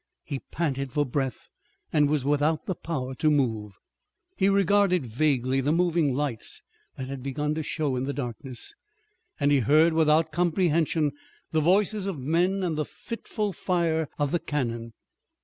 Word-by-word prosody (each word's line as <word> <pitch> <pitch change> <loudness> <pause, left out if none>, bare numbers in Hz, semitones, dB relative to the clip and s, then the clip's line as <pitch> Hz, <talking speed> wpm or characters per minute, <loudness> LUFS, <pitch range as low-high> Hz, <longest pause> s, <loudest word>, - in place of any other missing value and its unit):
He 140 -3 -4
panted 135 -5 -3
for 145 +2 +1
breath 130 -1 -3 0.5
and 150 -2 +4
was 145 -3 0
without 150 +2 +1
the 185 - -1
power 135 -7 -4
to 155 +4 +1
move. 115 -8 0 0.6
He 195 0 +3
regarded 195 -4 +3
vaguely 130 +1 +1
the 145 +3 +1
moving 165 -5 +2
lights 140 -5 -3 0.3
that 130 - -5
had 135 -1 -6
begun 150 +3 -2
to 160 - -2
show 150 -3 -1
in 125 +1 -1
the 140 - -1
darkness, 125 -2 -5 0.7
and 145 -1 +3
he 140 - +5
heard 155 +7 +4
without 160 0 +3
comprehension 165 -2 +2 0.4
the 160 - +2
voices 195 +4 +2
of 190 -5 -3
men 175 +8 +1
and 160 -4 -1
the - - +2
fitful 215 0 -4
fire 165 -3 0
of 145 -2 0
the 175 - +1
cannon. 120 -7 -3
150 Hz, 160 wpm, -27 LUFS, 135-170 Hz, 0.7 s, he